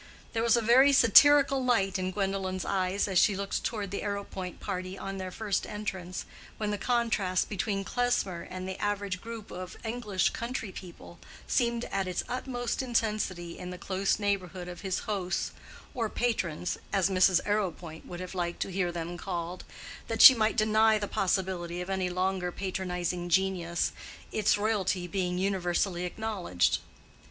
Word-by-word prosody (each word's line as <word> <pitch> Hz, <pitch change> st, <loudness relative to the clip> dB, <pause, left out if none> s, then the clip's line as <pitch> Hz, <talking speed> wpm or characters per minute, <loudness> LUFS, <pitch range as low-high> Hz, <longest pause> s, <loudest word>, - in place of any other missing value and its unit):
There 225 Hz, -, 0 dB
was 235 Hz, 0 st, +4 dB
a 235 Hz, -, 0 dB
very 260 Hz, +5 st, +6 dB
satirical 275 Hz, +2 st, +7 dB
light 195 Hz, -6 st, +2 dB
in 185 Hz, 0 st, -1 dB
Gwendolen's 190 Hz, -1 st, -2 dB
eyes 190 Hz, +1 st, 0 dB
as 190 Hz, -3 st, +3 dB
she 205 Hz, -, +4 dB
looked 200 Hz, +1 st, -2 dB
toward 205 Hz, -4 st, -3 dB
the 200 Hz, -, -3 dB
Arrowpoint 200 Hz, -3 st, -4 dB
party 185 Hz, -1 st, -4 dB
on 195 Hz, 0 st, -5 dB
their 185 Hz, 0 st, -4 dB
first 205 Hz, +1 st, -2 dB
entrance, 190 Hz, -4 st, -5 dB, 0.3 s
when 210 Hz, -1 st, -1 dB
the 205 Hz, -, -2 dB
contrast 215 Hz, -6 st, +1 dB
between 200 Hz, 0 st, -1 dB
Klesmer 200 Hz, -7 st, 0 dB
and 185 Hz, 0 st, -7 dB
the 190 Hz, 0 st, -5 dB
average 200 Hz, -2 st, -1 dB
group 230 Hz, -2 st, -8 dB
of 185 Hz, 0 st, -7 dB
English 220 Hz, -5 st, 0 dB
country 235 Hz, -3 st, -4 dB
people 175 Hz, -2 st, -11 dB, 0.3 s
seemed 235 Hz, -1 st, +1 dB
at 195 Hz, -1 st, -1 dB
its 180 Hz, -, -1 dB
utmost 245 Hz, -1 st, -2 dB
intensity 210 Hz, -8 st, -1 dB
in 180 Hz, -, -6 dB
the 180 Hz, -, -6 dB
close 195 Hz, +1 st, 0 dB
neighborhood 190 Hz, -3 st, -2 dB
of 175 Hz, -1 st, -8 dB
his 190 Hz, -2 st, -1 dB
hosts—or 210 Hz, +3 st, -4 dB
patrons, 185 Hz, -9 st, -1 dB
as 195 Hz, -3 st, +3 dB
Mrs. 185 Hz, -1 st, +5 dB
Arrowpoint 180 Hz, -6 st, -2 dB
would 175 Hz, 0 st, -7 dB
have 185 Hz, 0 st, -6 dB
liked 175 Hz, -2 st, -2 dB
to -, -, -7 dB
hear 180 Hz, -1 st, 0 dB
them 170 Hz, 0 st, -5 dB
called, 175 Hz, -1 st, -4 dB, 0.4 s
that -, -, +3 dB
she 260 Hz, -, +13 dB
might 220 Hz, -1 st, +1 dB
deny 220 Hz, 0 st, +4 dB
the 205 Hz, -1 st, -3 dB
possibility 180 Hz, -3 st, -1 dB
of 180 Hz, +2 st, -4 dB
any 190 Hz, -1 st, 0 dB
longer 185 Hz, 0 st, -1 dB
patronizing 180 Hz, -2 st, -3 dB
genius, 175 Hz, -2 st, +1 dB, 0.4 s
its 215 Hz, -1 st, +2 dB
royalty 200 Hz, -4 st, 0 dB
being 180 Hz, 0 st, -1 dB
universally 180 Hz, -1 st, 0 dB
acknowledged. 190 Hz, -, 0 dB
195 Hz, 160 wpm, -29 LUFS, 180-215 Hz, 0.4 s, she